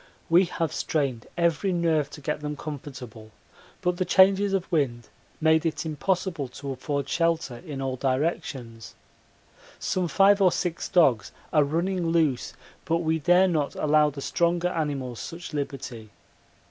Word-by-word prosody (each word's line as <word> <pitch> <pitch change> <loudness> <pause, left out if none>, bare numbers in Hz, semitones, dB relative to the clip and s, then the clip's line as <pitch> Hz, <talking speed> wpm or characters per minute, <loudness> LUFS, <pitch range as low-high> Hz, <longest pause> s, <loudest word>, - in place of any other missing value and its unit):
We 175 +3 +6
have 165 -2 -3
strained 135 -7 -1
every 170 +3 +1
nerve 165 -4 +1
to 150 +1 -11
get 150 +1 -3
them 150 0 -4
comfortable, 130 -7 -8 0.5
but 180 0 +1
the 185 - +1
changes 195 +2 +4
of 190 -2 -2
wind 125 -8 0 0.3
made 160 0 +3
it 165 0 -2
impossible 165 -1 -1
to 135 +2 -7
afford 140 +1 -3
shelter 165 -6 0
in 140 -3 -6
all 130 -1 -2
directions. 130 -4 -3 0.8
Some 185 -1 -1
five 200 +4 +4
or 185 -2 +6
six 170 -2 -2
dogs 130 - +3 0.2
are 150 -2 +5
running 170 +4 -1
loose, 160 -6 +1 0.3
but 165 +1 0
we 160 0 +1
dare 180 +4 +4
not 155 -5 -1
allow 150 0 +3
the 140 -1 -8
stronger 170 +3 +1
animals 140 -8 -3
such 165 -1 -7
liberty. 130 -6 -5
155 Hz, 145 wpm, -26 LUFS, 140-175 Hz, 0.8 s, We